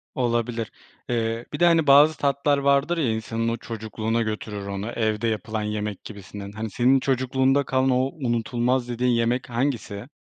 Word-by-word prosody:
Olabilir, 120 Hz, -2 st, -1 dB, 0.4 s
eee, 115 Hz, 0 st, -1 dB
bir 150 Hz, -, -4 dB
de, 175 Hz, -, +5 dB
hani, 165 Hz, -3 st, +4 dB
bazı 145 Hz, +3 st, +7 dB
tatlar 140 Hz, +1 st, +1 dB
vardır 140 Hz, +4 st, +2 dB
ya, 140 Hz, -8 st, +1 dB
insanın 115 Hz, +1 st, -2 dB
o 115 Hz, -, -1 dB
çocukluğuna 110 Hz, 0 st, -3 dB
götürür 105 Hz, -2 st, -4 dB
onu, 100 Hz, +3 st, -4 dB
evde 110 Hz, -1 st, -1 dB
yapılan 110 Hz, 0 st, -2 dB
yemek 105 Hz, -1 st, -4 dB
gibisinden. 100 Hz, -1 st, -9 dB
Hani, 110 Hz, +1 st, -5 dB
senin 130 Hz, +5 st, +3 dB
çocukluğunda 130 Hz, +1 st, +1 dB
kalan, 130 Hz, 0 st, +1 dB
o 125 Hz, -1 st, +3 dB, 0.2 s
unutulmaz 120 Hz, -1 st, 0 dB
dediğin 125 Hz, +1 st, 0 dB
yemek 120 Hz, +2 st, 0 dB
hangisi? 120 Hz, -3 st, -2 dB
120 Hz, 160 wpm, -24 LUFS, 110-130 Hz, 0.4 s, bazı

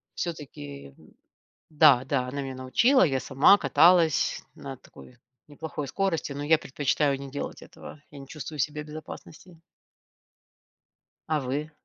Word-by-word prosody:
Всё-таки 70 Hz, -, -7 dB, 0.8 s
да, 145 Hz, -5 st, +5 dB
да, 130 Hz, -2 st, -1 dB
она 135 Hz, +3 st, -5 dB
меня 135 Hz, -1 st, -5 dB
научила, 130 Hz, -, +3 dB
я 135 Hz, -6 st, 0 dB
сама 140 Hz, +11 st, +5 dB
каталась 170 Hz, -4 st, +3 dB
на 135 Hz, -1 st, -8 dB
такой, 125 Hz, 0 st, -17 dB, 0.3 s
неплохой 150 Hz, -1 st, -6 dB
скорости, 190 Hz, -5 st, -2 dB
но 140 Hz, +1 st, -5 dB
я 155 Hz, +2 st, +4 dB
предпочитаю 140 Hz, 0 st, -1 dB
не 140 Hz, -1 st, -8 dB
делать 145 Hz, -, -6 dB
этого, 150 Hz, -, -13 dB
я 145 Hz, -, -12 dB
не 135 Hz, -, -11 dB
чувствую 155 Hz, +1 st, -8 dB
себя 150 Hz, +2 st, -2 dB
в -, -, -15 dB
безопасности. 155 Hz, +2 st, -11 dB, 1.7 s
А 155 Hz, -1 st, +1 dB
вы? 145 Hz, +4 st, -4 dB
145 Hz, 135 wpm, -26 LUFS, 135-155 Hz, 1.7 s, да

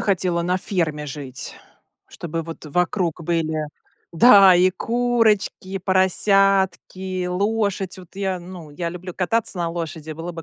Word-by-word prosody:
хотела 180 Hz, -4 st, 0 dB
на 180 Hz, +2 st, 0 dB
ферме 155 Hz, -6 st, -2 dB
жить, 135 Hz, -2 st, -6 dB, 0.5 s
чтобы 165 Hz, 0 st, -5 dB
вот 165 Hz, 0 st, -9 dB
вокруг 175 Hz, +1 st, -1 dB
были 160 Hz, -2 st, -1 dB, 0.5 s
да, 195 Hz, 0 st, +8 dB
и 180 Hz, +1 st, +4 dB
курочки, 230 Hz, -2 st, 0 dB
и 195 Hz, 0 st, -3 dB
поросятки, 190 Hz, -1 st, +1 dB
лошадь 195 Hz, 0 st, -1 dB
вот. 180 Hz, -1 st, -14 dB
Я 190 Hz, -2 st, -2 dB
ну, 175 Hz, -3 st, -10 dB
я 170 Hz, +3 st, -4 dB
люблю 180 Hz, +1 st, -7 dB
кататься 210 Hz, +2 st, -1 dB
на 170 Hz, -1 st, -1 dB
лошади. 165 Hz, -2 st, -5 dB
Было 165 Hz, +3 st, -6 dB
бы 165 Hz, -1 st, -8 dB
180 Hz, 140 wpm, -22 LUFS, 165-195 Hz, 0.5 s, да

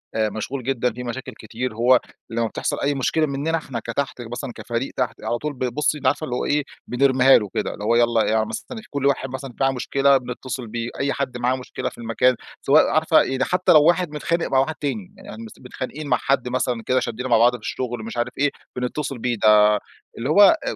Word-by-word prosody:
آآ 110 Hz, -1 st, +1 dB
مشغول 120 Hz, +5 st, -5 dB
جدًا، 125 Hz, -2 st, 0 dB
في 125 Hz, +1 st, -7 dB
مشاكل 125 Hz, +2 st, -6 dB
كتير؛ 115 Hz, +2 st, -4 dB
هوّ 120 Hz, +2 st, +4 dB, 0.3 s
لمّا 115 Hz, 0 st, -1 dB
بتحصل -, -, -3 dB
أي 140 Hz, 0 st, +1 dB
مشكلة 155 Hz, +4 st, +1 dB
مننا 150 Hz, +3 st, -1 dB
إحنا 130 Hz, -6 st, -5 dB
كتحت 125 Hz, +2 st, -3 dB
مثلًا 120 Hz, +3 st, -6 dB
كفريق 120 Hz, +2 st, -4 dB
تحت، 125 Hz, -, -2 dB
على 120 Hz, -, -1 dB
طول 150 Hz, +2 st, -4 dB
ب 130 Hz, -1 st, -3 dB
بُصّي، 150 Hz, +1 st, +1 dB
أنتِ 145 Hz, -, -2 dB
عارفة -, -, +1 dB
اللي 125 Hz, -4 st, -3 dB
هوّ -, -, -2 dB
إيه، 145 Hz, 0 st, +1 dB, 0.2 s
بنرميها 130 Hz, +1 st, +5 dB
له 105 Hz, -3 st, -3 dB
كده؛ -, -, 0 dB
اللي -, -, -9 dB
هوّ 115 Hz, +2 st, +2 dB
يلّا 120 Hz, -1 st, +3 dB
يع 110 Hz, 0 st, +2 dB
مثلًا، 225 Hz, -, -6 dB
كل 140 Hz, -1 st, -3 dB
واحد 135 Hz, -1 st, +1 dB
مثلًا 130 Hz, -1 st, -7 dB
معاه 135 Hz, 0 st, +4 dB
مشكلة 135 Hz, +2 st, +2 dB
بنتصل 125 Hz, 0 st, -6 dB
بيه، 115 Hz, +1 st, -4 dB
أي 140 Hz, 0 st, 0 dB
حد 135 Hz, -3 st, -3 dB
معاه 125 Hz, +1 st, +1 dB
مشكلة 130 Hz, -1 st, -5 dB
في -, -, -17 dB
المكان، 120 Hz, +2 st, +2 dB, 0.3 s
سواء 145 Hz, +3 st, +5 dB
عارفة، 155 Hz, +1 st, +4 dB
يعني 130 Hz, 0 st, -1 dB
حتّى 180 Hz, 0 st, +2 dB
لو 155 Hz, -3 st, +7 dB
واحد 175 Hz, 0 st, +2 dB
متخانق 165 Hz, +3 st, -1 dB
مع 130 Hz, -, +2 dB
واحد 155 Hz, +4 st, 0 dB
تاني، 185 Hz, +7 st, -4 dB
يعني 115 Hz, -, -10 dB
مثلًا 110 Hz, -, -14 dB
متخانقين 140 Hz, +4 st, -6 dB
مع 125 Hz, -, +3 dB
حد 130 Hz, -2 st, 0 dB
مثلًا 125 Hz, -2 st, -1 dB
كده 130 Hz, 0 st, +2 dB
شدينا 125 Hz, +2 st, -4 dB
مع 115 Hz, -, +5 dB
بعض 120 Hz, +2 st, +5 dB
في 120 Hz, -, -8 dB
الشغل، 120 Hz, 0 st, -4 dB
مش 115 Hz, +2 st, -7 dB
عارف 120 Hz, +1 st, -1 dB
إيه، 145 Hz, +1 st, +3 dB, 0.3 s
بنتصل 130 Hz, +2 st, -3 dB
بيه 120 Hz, 0 st, -1 dB
ده، 105 Hz, -1 st, +6 dB, 0.4 s
اللي 125 Hz, +5 st, -3 dB
هو 200 Hz, -, +6 dB, 0.3 s
آآ -, -, -2 dB
130 Hz, 225 wpm, -22 LUFS, 120-140 Hz, 0.4 s, لو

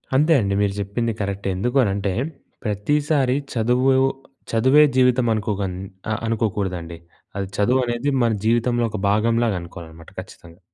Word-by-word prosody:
అంతే 155 Hz, +4 st, +4 dB
అండి. 100 Hz, -1 st, -1 dB
మీరు 100 Hz, -1 st, +1 dB
చెప్పింది 115 Hz, +4 st, -2 dB
కరెక్టే. 100 Hz, 0 st, -3 dB
ఎందుకు 125 Hz, +8 st, -1 dB
అనంటే 100 Hz, -2 st, -1 dB, 0.5 s
ప్రతిసారి 135 Hz, +5 st, +1 dB, 0.2 s
చదువు 125 Hz, +3 st, +2 dB, 0.6 s
చదువే 130 Hz, +6 st, +5 dB
జీవితం 125 Hz, -1 st, +3 dB
అనుకోక 105 Hz, -2 st, -2 dB, 0.7 s
అనుకోకూడదండి. 95 Hz, -7 st, -2 dB, 0.4 s
అది 100 Hz, -1 st, -2 dB
చదువు 120 Hz, +6 st, +2 dB
అనేది 120 Hz, +4 st, -1 dB
మన 115 Hz, -, +2 dB
జీవితంలో 120 Hz, +1 st, +2 dB
ఒక 110 Hz, -, -5 dB
భాగంలాగా 115 Hz, +1 st, +2 dB
అనుకోవాలన్నమాట 85 Hz, -1 st, -11 dB
ఖచ్చితంగా. 85 Hz, 0 st, -12 dB
110 Hz, 125 wpm, -22 LUFS, 100-125 Hz, 0.7 s, చదువే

